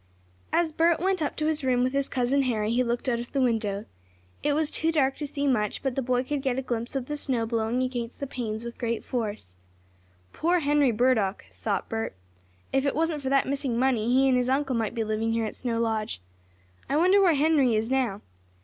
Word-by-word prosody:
As 340 Hz, -2 st, +2 dB
Bert 330 Hz, +2 st, +3 dB
went 375 Hz, -1 st, 0 dB
up 295 Hz, -, -1 dB
to 305 Hz, -, -2 dB
his 310 Hz, -1 st, 0 dB
room 250 Hz, -1 st, +2 dB
with 255 Hz, +1 st, 0 dB
his 275 Hz, 0 st, 0 dB
cousin 260 Hz, +2 st, +1 dB
Harry 220 Hz, -5 st, 0 dB
he 250 Hz, +1 st, +3 dB
looked 240 Hz, +2 st, -2 dB
out 235 Hz, -2 st, +1 dB
of 240 Hz, -, -8 dB
the 275 Hz, -, +1 dB
window. 220 Hz, -5 st, 0 dB, 0.6 s
It 295 Hz, -, +1 dB
was 310 Hz, 0 st, +1 dB
too 325 Hz, 0 st, +1 dB
dark 275 Hz, -4 st, +2 dB
to 295 Hz, -, -4 dB
see 285 Hz, 0 st, -3 dB
much, 215 Hz, -7 st, 0 dB
but 270 Hz, -2 st, 0 dB
the 270 Hz, -, -1 dB
boy 250 Hz, 0 st, +1 dB
could 285 Hz, +1 st, -2 dB
get 260 Hz, -2 st, -1 dB
a 265 Hz, -, -1 dB
glimpse 240 Hz, +1 st, -3 dB
of 265 Hz, -2 st, -1 dB
the 295 Hz, -, -4 dB
snow 255 Hz, -5 st, -1 dB
blowing 230 Hz, +2 st, 0 dB
against 245 Hz, -2 st, -4 dB
the 280 Hz, -, -2 dB
panes 230 Hz, -4 st, -4 dB
with 235 Hz, 0 st, -8 dB
great 235 Hz, -1 st, -2 dB
force. 210 Hz, -, -4 dB, 0.8 s
"Poor 345 Hz, +2 st, +1 dB
Henry 290 Hz, -2 st, +3 dB
Burdock!" 220 Hz, -4 st, +1 dB
thought 200 Hz, -4 st, -2 dB
Bert. 225 Hz, -, -3 dB, 0.6 s
"If 270 Hz, -, +2 dB
it -, -, 0 dB
wasn't 320 Hz, -1 st, 0 dB
for 265 Hz, -, -2 dB
that 275 Hz, 0 st, +3 dB
missing 270 Hz, -3 st, -1 dB
money 245 Hz, -3 st, +2 dB
he 265 Hz, +2 st, +4 dB
and 255 Hz, -1 st, +4 dB
his 250 Hz, 0 st, 0 dB
uncle 270 Hz, -1 st, +1 dB
might 225 Hz, 0 st, -1 dB
be 230 Hz, -, 0 dB
living 220 Hz, +1 st, -1 dB
here 230 Hz, -1 st, 0 dB
at 215 Hz, -, -5 dB
Snow 235 Hz, -2 st, -2 dB
Lodge. 220 Hz, -, -1 dB, 0.7 s
I 285 Hz, -, +2 dB
wonder 370 Hz, +5 st, +5 dB
where 355 Hz, -5 st, +5 dB
Henry 285 Hz, -5 st, +3 dB
is 220 Hz, +3 st, -1 dB
now? 245 Hz, -7 st, 0 dB
255 Hz, 225 wpm, -27 LUFS, 230-280 Hz, 0.8 s, wonder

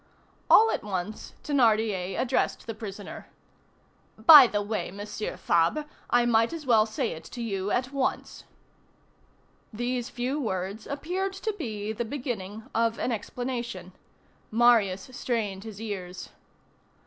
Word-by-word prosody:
All 450 Hz, +1 st, +7 dB
at -, -, -2 dB
once, 205 Hz, +1 st, -5 dB
Thénardier 220 Hz, -9 st, +1 dB
addressed 255 Hz, 0 st, 0 dB
the 225 Hz, -, -4 dB
prisoner: 210 Hz, -2 st, -8 dB, 0.9 s
"By 265 Hz, +4 st, +10 dB
the 205 Hz, -2 st, -1 dB
way, 205 Hz, -4 st, -3 dB
Monsieur 205 Hz, +3 st, -6 dB
Fabre, 170 Hz, -, +1 dB, 0.2 s
I 245 Hz, 0 st, +4 dB
might 230 Hz, -1 st, +3 dB
as 320 Hz, -3 st, -6 dB
well 225 Hz, -3 st, +4 dB
say 235 Hz, +1 st, -2 dB
it 160 Hz, -, -8 dB
to 245 Hz, -, -9 dB
you 200 Hz, -4 st, -2 dB
at 250 Hz, +4 st, 0 dB
once." 275 Hz, -2 st, -2 dB, 1.3 s
These 240 Hz, +2 st, -2 dB
few 255 Hz, +4 st, -2 dB
words 195 Hz, -1 st, -3 dB
appeared 360 Hz, +7 st, -3 dB
to 420 Hz, +3 st, -3 dB
be 215 Hz, -, -4 dB
the 220 Hz, -, -2 dB
beginning 220 Hz, -5 st, -5 dB
of 230 Hz, 0 st, +1 dB
an 250 Hz, -, -1 dB
explanation. 235 Hz, -4 st, -4 dB, 0.6 s
Marius 220 Hz, -4 st, +3 dB
strained 215 Hz, -6 st, -2 dB
his 215 Hz, -3 st, -8 dB
ears. 185 Hz, -5 st, -6 dB
225 Hz, 130 wpm, -27 LUFS, 205-250 Hz, 1.3 s, By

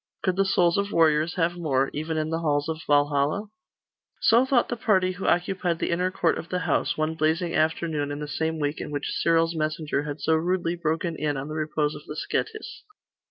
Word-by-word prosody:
Could 185 Hz, -2 st, +1 dB
the 195 Hz, +1 st, +2 dB
souls 180 Hz, -1 st, +3 dB
of 200 Hz, 0 st, -2 dB
warriors 160 Hz, 0 st, +3 dB
have 175 Hz, -1 st, +1 dB
more, 140 Hz, -5 st, 0 dB
even 155 Hz, +2 st, -3 dB
in 155 Hz, 0 st, -1 dB
the 165 Hz, -, 0 dB
halls 145 Hz, -2 st, 0 dB
of 160 Hz, 0 st, -3 dB
Valhalla? 145 Hz, +7 st, +2 dB, 0.7 s
So 235 Hz, +3 st, +4 dB
thought 255 Hz, -3 st, +3 dB
the 240 Hz, -, -1 dB
party 190 Hz, -5 st, +2 dB
who 185 Hz, +1 st, -5 dB
occupied 175 Hz, -1 st, +1 dB
the -, -, -2 dB
inner 180 Hz, +2 st, +1 dB
court 175 Hz, -3 st, 0 dB
of 170 Hz, -, -9 dB
the 180 Hz, 0 st, -1 dB
house, -, -, 0 dB
one 155 Hz, +1 st, 0 dB
blazing 160 Hz, +2 st, 0 dB
afternoon 155 Hz, -2 st, 0 dB
in 145 Hz, -, -4 dB
the 150 Hz, 0 st, -5 dB
same 160 Hz, +3 st, -2 dB
week 145 Hz, 0 st, -2 dB
in -, -, -5 dB
which 145 Hz, -1 st, -3 dB
Cyril's 165 Hz, 0 st, +3 dB
messenger 155 Hz, -2 st, -1 dB
had 145 Hz, 0 st, -5 dB
so 160 Hz, +3 st, +1 dB
rudely 170 Hz, +1 st, 0 dB
broken 165 Hz, 0 st, -1 dB
in 145 Hz, -2 st, -1 dB
on 135 Hz, +2 st, -5 dB
the -, -, -5 dB
repose 155 Hz, -1 st, -1 dB
of 150 Hz, -, -10 dB
the 150 Hz, -, -6 dB
Scetis. 440 Hz, -, -4 dB
160 Hz, 210 wpm, -25 LUFS, 150-175 Hz, 0.7 s, So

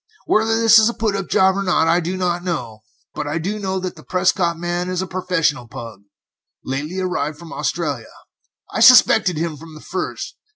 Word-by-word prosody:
Whether 225 Hz, +1 st, +2 dB
this 225 Hz, -1 st, +7 dB
is 220 Hz, +1 st, +4 dB
a 235 Hz, -, -5 dB
put 215 Hz, -2 st, -1 dB
up 195 Hz, -2 st, -3 dB
job 190 Hz, 0 st, +3 dB
or 200 Hz, -, -1 dB
not, 180 Hz, -4 st, +2 dB
I 170 Hz, +2 st, +3 dB
do 180 Hz, +2 st, -3 dB
not 175 Hz, -1 st, -1 dB
know, 125 Hz, -12 st, -4 dB, 0.3 s
but 150 Hz, -, -4 dB
I 150 Hz, +2 st, -2 dB
do 195 Hz, +6 st, -3 dB
know 190 Hz, -1 st, -2 dB
that 185 Hz, -1 st, -5 dB
the -, -, -13 dB
Prescott 180 Hz, -2 st, 0 dB
man 175 Hz, +1 st, -3 dB
is 185 Hz, 0 st, -2 dB
a -, -, -4 dB
professional 175 Hz, -8 st, -1 dB
pug, 115 Hz, -5 st, -9 dB, 0.6 s
lately 150 Hz, +8 st, -4 dB
arrived 155 Hz, -5 st, -2 dB
from 165 Hz, +1 st, -11 dB
Australia. 145 Hz, -9 st, -3 dB, 0.6 s
I -, -, -3 dB
suspected 180 Hz, -4 st, +6 dB
him 160 Hz, -1 st, -3 dB
from 160 Hz, +1 st, -13 dB
the -, -, -10 dB
first. 185 Hz, +3 st, -5 dB
175 Hz, 200 wpm, -20 LUFS, 155-190 Hz, 0.6 s, this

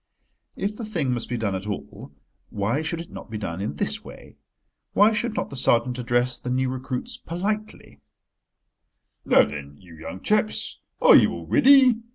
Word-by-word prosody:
If 205 Hz, +2 st, -3 dB
the 230 Hz, -, -7 dB
thing 165 Hz, -, -1 dB
must 120 Hz, -2 st, -2 dB
be 120 Hz, -, -2 dB
done 110 Hz, -4 st, -1 dB
at 95 Hz, +2 st, -4 dB
all, 105 Hz, -, -7 dB, 0.4 s
why 110 Hz, +8 st, -1 dB
should 160 Hz, +1 st, -3 dB
it 170 Hz, -, -12 dB
not -, -, -10 dB
be 110 Hz, -, -5 dB
done 95 Hz, -3 st, -4 dB
in 100 Hz, -7 st, -3 dB
this -, -, -2 dB
way? -, -, -13 dB, 0.6 s
Why 210 Hz, +2 st, +5 dB
should 220 Hz, +1 st, -2 dB
not -, -, -3 dB
the -, -, -6 dB
sergeant 125 Hz, 0 st, +1 dB
address 120 Hz, +1 st, 0 dB
the 125 Hz, -, -6 dB
new 130 Hz, +1 st, 0 dB
recruits 130 Hz, -, -4 dB
politely: 210 Hz, +2 st, -5 dB, 1.2 s
"Now -, -, +5 dB
then, 70 Hz, -1 st, -8 dB
you 90 Hz, 0 st, -16 dB
young 80 Hz, +3 st, -8 dB
chaps, 215 Hz, 0 st, 0 dB, 0.2 s
are -, -, +9 dB
you -, -, +6 dB
all -, -, -7 dB
ready? 260 Hz, -4 st, +6 dB
130 Hz, 180 wpm, -24 LUFS, -, 1.2 s, are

